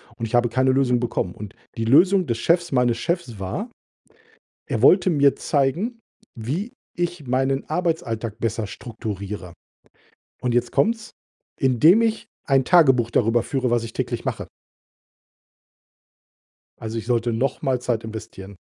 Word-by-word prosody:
und 115 -1 -4
ich 115 - -2
habe 120 0 +4
keine 130 +2 +2
Lösung 130 -2 +2
bekommen.“ 105 -7 -2
Und 105 -2 -9 0.2
die 115 - -1
Lösung 180 - +4
des 115 - -1
Chefs, 170 +5 +1
meines 125 -3 +2
Chefs 135 - -3
war, 155 - -4 1.0
er - - -2
wollte 185 0 +5
mir 140 -4 +3
zeigen, 170 - -1 0.3
wie 145 - -4 0.2
ich 175 -4 -3
meinen 135 +2 0
Arbeitsalltag 130 - -2
besser 115 -1 -2
strukturiere. 100 -4 -7 0.9
Und 125 -1 -1
jetzt 120 0 +1
kommt's, 225 0 0 0.5
indem 150 - +5
ich 225 0 -1 0.2
ein 135 -2 +2
Tagebuch 130 -10 +4
darüber 115 0 +2
führe, 130 -3 -1
was 120 -1 +2
ich 115 -1 -7
täglich - - -3
mache. - - -4 2.3
Also, 110 0 -5
ich 115 - -5
sollte 120 0 0
noch 120 +5 -1
mal 130 -2 0
Zeit 120 -2 -2
investieren. 100 -3 -9
125 Hz, 140 wpm, -22 LUFS, 115-160 Hz, 2.3 s, wollte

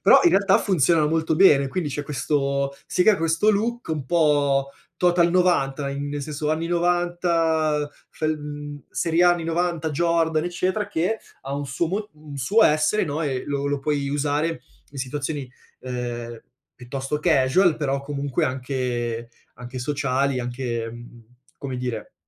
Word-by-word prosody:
però - - +7
in 350 - +5
realtà 200 -5 +4
funzionano 165 -4 +3
molto 160 0 +1
bene, 145 -7 +6
quindi 155 +1 -2
c'è 145 +2 -3
questo 140 -1 -1
si 180 - +1
crea 210 0 +5
questo 165 +6 +2
look 230 +2 -1
un 150 -4 -3
po' 145 -4 +2 0.3
total 175 -1 +3
'90, 150 -6 +1
in 140 +1 -4
nel 145 0 -4
senso 150 +1 -3
anni 160 +1 -1
'90 170 -3 +1 0.2
fel 155 -1 -2
mhmm, 145 -1 -7
serie 165 0 +1
A 175 - +7
anni 175 -2 -3
'90 165 -1 -1
Jordan 165 0 +1
eccetera, 185 +4 -1
che 195 +4 0 0.2
ha 135 +1 -4
un 145 0 -3
suo 135 +6 -1
mo 210 +3 -3
un 150 -2 -10
suo 210 - +4
essere, 155 +8 +3
no, 150 -1 -3
e 135 -4 -2
lo 140 0 -2
lo 145 0 0
puoi 140 -1 -1
usare 145 +3 -1 0.3
in 140 - -8
situazioni 140 +1 -3 0.3
ehm, 120 -2 -5 0.3
piuttosto 135 +3 -4
casual, 160 +2 +3
però 140 -2 -1
comunque 140 -2 -2
anche 125 -3 -2 0.3
anche 125 +1 -8
sociali, 135 0 0
anche, 120 -2 -3
mhmm, 120 0 -12 0.3
come 135 -3 -5
dire, 125 -3 -5
145 Hz, 155 wpm, -23 LUFS, 135-170 Hz, 0.3 s, però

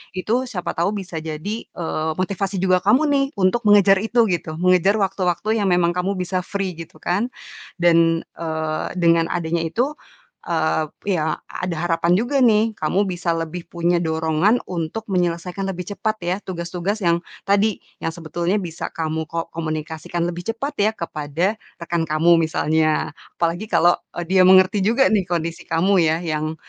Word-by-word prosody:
itu 185 +4 -2
siapa 195 -8 -3
tau 170 +4 +1
bisa 190 -4 -5
jadi, 160 +8 -4
eee, 160 -2 -3
motivasi 195 +1 -1
juga 185 -1 +4
kamu 225 +8 +5
nih 275 -1 +3
untuk 190 +6 +2
mengejar 200 -1 +6
itu 235 +1 +3
gitu. 170 -3 -2
Mengejar 185 +2 +4
waktu-waktu 195 +2 0
yang - - +1
memang 175 -1 +3
kamu 180 +2 0
bisa 185 +1 -1
free 195 -3 -3
gitu 165 - -9
kan. 200 +7 0 0.5
Dan, 165 -1 +4
eee, 160 -1 -3
dengan 165 -1 +4
adanya 170 -1 -1
itu, 250 - -1 0.5
eee, 160 -1 +1 0.3
ya 155 -2 0 0.2
ada 180 -1 -3
harapan 170 0 +2
juga 245 +8 +1
nih 225 -3 +4
kamu 180 +6 +1
bisa 175 -2 -1
lebih 165 +1 -5
punya 170 0 +1
dorongan 160 +6 +1
untuk 170 +5 -3
menyelesaikan 180 +1 -1
lebih 180 0 -5
cepat 215 +3 -1
ya 175 +1 0
tugas-tugas 180 +2 -4
yang 170 -1 +3 0.2
tadi, 205 +1 +2 0.2
yang - - -3
sebetulnya 170 +3 -2
bisa 175 -5 -4
kamu 160 -1 -3
ko 165 0 -4
komunikasikan 160 +1 -4
lebih 175 0 -6
cepat 255 +6 -3
ya, 210 +2 +3
kepada 170 +5 -2 0.2
rekan 170 0 -1
kamu 165 +2 +4
misalnya. 160 -1 +1 0.2
Apalagi 175 +5 -1
kalo, 175 -4 +3 0.2
eee, 175 - -3
dia 190 -1 +5
mengerti 190 +2 +6
juga 235 +7 +4
nih 200 -4 +2
kondisi 170 -1 -2
kamu 170 +4 +2
ya, 160 +1 +2
yang 155 -1 -2
175 Hz, 160 wpm, -21 LUFS, 165-195 Hz, 0.5 s, mengejar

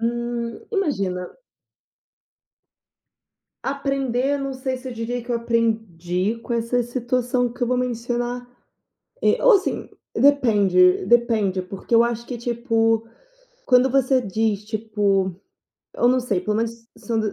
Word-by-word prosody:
Hum. 235 0 -3
Imagina. 200 - -1 2.3
Aprender, 275 -1 -1
eu - - -1
não 275 0 -3
sei 260 0 -3
se 255 +1 -8
eu 255 - -5
diria 235 +2 -3
que 245 - -9
eu 235 - +2
aprendi 220 -4 -1
com 240 - -4
essa 235 +1 0
situação 245 0 -1
que 250 - -17
eu - - +3
vou 250 +1 +1
mencionar. 245 0 -2 0.7
Eh, - - +3
assim, 445 -6 +3 0.3
depende 205 -11 +4
depende, 220 -5 +2
porque 190 +5 -7
eu 230 - +7
acho 235 0 -2
que, 245 -1 -5
tipo, 230 -1 +1 0.6
quando 250 +1 +5
você 265 0 +3
diz, 210 0 -1
tipo, 205 -3 0 0.6
eu 240 - +3
não 255 +1 +3
sei, 235 -7 -1
pelo 210 +3 -2
menos 230 0 -3
são 230 -2 -2
235 Hz, 130 wpm, -22 LUFS, 220-250 Hz, 2.3 s, eu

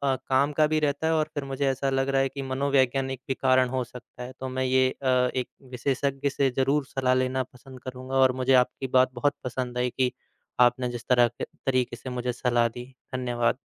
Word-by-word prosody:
काम 130 +2 +1
का 155 -1 +5
भी 155 0 +1
रहता 150 +1 0
है 160 - +2
और 155 -1 +1
फिर 145 - -3
मुझे 135 +1 -2
ऐसा 135 +1 -1
लग 135 0 0
रहा 135 0 +3
है 135 - +1
कि 140 +1 -6
मनोवैज्ञानिक 135 -1 0
भी 135 - 0
कारण 130 -1 +3
हो 130 0 -1
सकता 125 0 -11
है। 125 - -7
तो 130 0 -4
मैं 130 0 -2
ये 130 0 +3
अ, 135 - -11
एक 125 0 +1 0.2
विशेषज्ञ 135 +2 -1
से 135 -1 +1
ज़रूर 135 +2 +2
सलाह 130 -1 0
लेना 130 0 +1
पसंद 130 +1 -14
करूँगा। 130 +1 -6
और 130 -1 +5
मुझे 130 +1 +3
आपकी 135 - -7
बात 130 0 +4
बहुत 145 +4 0
पसंद 125 0 -3
आई 125 0 +1
कि 130 -2 +2 0.5
आपने 125 +1 +4
जिस 120 -1 -7
तरह 120 -1 +5
के 120 - -8 0.2
तरीके 130 -2 +1
से 120 +2 -8
मुझे 125 0 -2
सलाह 120 -1 +2
दी। 120 +2 -8 0.3
धन्यवाद। 120 -1 0
130 Hz, 215 wpm, -26 LUFS, 125-135 Hz, 0.5 s, का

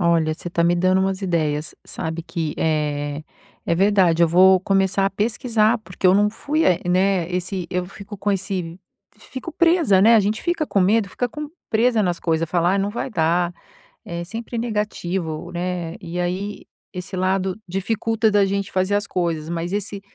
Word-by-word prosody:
Olha, 165 -2 +2
você 175 - -7
tá 170 - +1
me 170 +1 +3
dando 185 +2 +2
umas 190 +1 -1
ideias. 155 -3 -1
Sabe 160 +1 -5
que, 165 -2 -4
eh, 150 -1 -1 0.4
é - - +2
verdade, 185 -3 +3
eu 170 - +5
vou 185 +2 +6
começar 195 0 +1
a - - 0
pesquisar, 220 +2 +1
porque 185 -3 -3
eu 185 - +6
não 205 +1 +4
fui 300 +8 -1
a 180 -2 +4
né, 185 -1 +2
esse 180 0 -3
eu 180 -1 -1
fico 200 +2 -10
com 205 +1 -1
esse 185 -3 -3 0.4
f - - -19
fico 260 +6 -6
presa, 330 - +4
né, 225 +4 +6
a 225 - +6
gente 210 +2 -1
fica 345 -3 0
com 200 - +1
medo, 200 +3 +3
fica 245 +5 -2
com 300 +5 -6 0.2
presa 225 0 +2
nas 175 -3 -1
coisa, 165 -1 0
fala: 175 +1 +1
"Ai, 200 - +1
não 200 +1 0
vai 235 +4 -4
dar", 175 -2 +1 0.5
é 170 0 -5
sempre 225 +6 -6
negativo, 190 -7 -3
né. 175 -1 -3
E 170 +1 -5
aí 185 +4 -3 0.3
esse 180 0 -6
lado 185 0 0
dificulta 220 +4 0
da 205 -1 +4
gente 200 0 -2
fazer 185 +2 +1
as 205 0 0
coisas, 165 -3 -2
mas 170 +2 -3
esse 205 0 -3
185 Hz, 190 wpm, -22 LUFS, 170-205 Hz, 0.5 s, vou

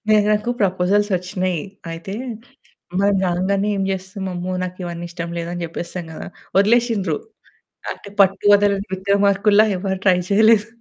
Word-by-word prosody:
లేదు, 210 -1 +5
నాకు 210 +3 0
ప్రపోజల్స్ 195 +2 +2
వచ్చినయి. 180 -1 -2 0.3
అయితే 165 +4 -6 0.9
మనం 200 0 +3
రాగానే 195 +3 0
ఏం 195 - -1
జేస్తాం 190 +1 -5
"అమ్మో! 180 +1 -4
నాకివన్నీ 175 -1 -5
ఇష్టం 170 -1 -5
లేదు" 170 0 -4
అని 175 -1 -4
జెప్పేస్తాం 170 +2 -5
గదా. - - -8 0.3
వదిలేసింన్రు. 210 -6 +2 0.8
అంటే - - -12
పట్టు 195 0 +3
వదలని 200 0 +2
విక్రమార్కుల్లా 200 +2 +3
ఎవరు 190 0 -2
ట్రై 180 -1 +5
చేయలేదు. 220 +1 +5
195 Hz, 135 wpm, -20 LUFS, 180-205 Hz, 0.9 s, లేదు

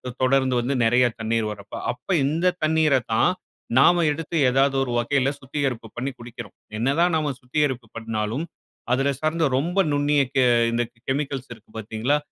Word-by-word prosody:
இத 125 -1 -6
தொடர்ந்து 130 0 +3
வந்து 130 +4 -1
நெறைய 125 +2 +4 0.2
தண்ணீர் 110 0 0
வர்றப்ப. 105 -1 -9 0.2
அப்ப 125 +1 -18 0.2
இந்த 170 +5 +1
தண்ணீர 155 -2 +3 0.2
தான், 145 +10 +4 0.5
நாம 170 +5 +5
எடுத்து 165 +2 -5
எதாவது 135 +1 +2
ஒரு 125 - -2
வகையி 135 +2 +1
சுத்திகரிப்பு 130 -4 -3
பண்ணி 130 +3 -2
குடிக்கிறோம். 120 -1 -10 0.2
என்னா 130 +4 +1
தான் 175 -1 +3
நாம 150 -3 0
சுத்திகரிப்பு 130 -2 -1
பண்ணாலும், 115 +5 -3 0.5
அதில 135 +2 +2
சார்ந்த 155 0 +1
ரொம்ப 175 +7 -2
நுண்ணிய 145 0 +2 0.2
கெ 130 - +5 0.3
இந்த 120 +1 +1 0.3
கெமிக்கல்ஸ் 135 -1 -2
இருக்கு 115 -1 -15
பாத்தீங்களா? 110 +6 0
135 Hz, 155 wpm, -23 LUFS, 120-150 Hz, 0.5 s, நாம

